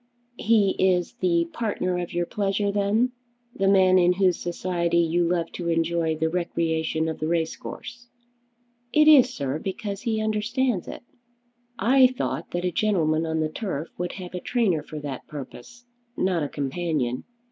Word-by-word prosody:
"He 210 -3 +3
is 180 -2 +2
the 170 -2 +2
partner 185 -5 -1
of 175 - -4
your 175 0 -1
pleasure 200 +1 -1
then; 205 +5 +1 0.4
the 195 - 0
man 185 -1 +5
in 175 0 +4
whose 185 -1 +2
society 170 -1 -1
you 170 +1 +2
love 170 -1 0
to 170 -1 -4
enjoy 165 -1 +1
the 160 +1 0
recreation 160 -2 -1
of 160 - -4
the 155 - -2
race 165 -1 0
course." 240 0 -9 0.8
"It 305 0 +5
is, 265 -5 +7
sir, 140 - -3
because 200 +2 -5
he 225 -3 -1
understands 215 0 0
it." - - -8 0.7
"I 255 +5 +5
thought 255 0 -4
that 175 +1 -3
a 180 - 0
gentleman 165 -6 +1
on 160 0 -1
the 155 - 0
turf 165 -3 -4
would 180 0 -2
have 185 -2 -8
a 180 - -3
trainer 200 -8 +1
for 155 +1 -9
that 140 -3 -6
purpose; 235 - -10 0.3
not 185 -3 +1
a 145 - -2
companion. 140 -3 -2
180 Hz, 165 wpm, -25 LUFS, 165-205 Hz, 0.8 s, is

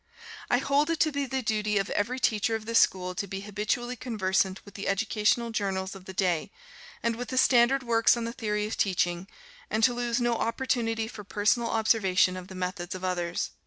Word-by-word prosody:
I 245 - +4
hold 280 +4 +1
it 330 -1 0
to 310 - +3
be 280 -1 -2
the 265 0 -2
duty 215 -1 0
of 195 +1 -1
every 245 +5 -1
teacher 225 -1 +1
of 220 -1 -5
this 230 0 +3
school 180 -1 +2
to 200 +2 -4
be 195 +1 -5
habitually 210 +4 -2
conversant 190 -5 -1
with 200 - -13
the 200 - -5
educational 215 +3 +1
journals 190 -3 -2
of 190 -2 -12
the 190 - -8
day, 180 -4 0 0.5
and 230 0 +1
with 245 0 -6
the 260 - -3
standard 255 +1 +4
works 230 0 +3
on 235 - -3
the 230 0 -4
theory 210 -3 -2
of 215 - -4
teaching, 175 -1 0 0.4
and 220 - 0
to 245 - +5
lose 240 0 -1
no 240 -1 +1
opportunity 230 -2 -1
for 220 -2 -9
personal 215 +4 +1
observation 195 -5 +2
of 185 0 -7
the 190 - -10
methods 180 -1 -4
of 185 - -8
others. 175 -2 -2
215 Hz, 205 wpm, -28 LUFS, 190-240 Hz, 0.5 s, to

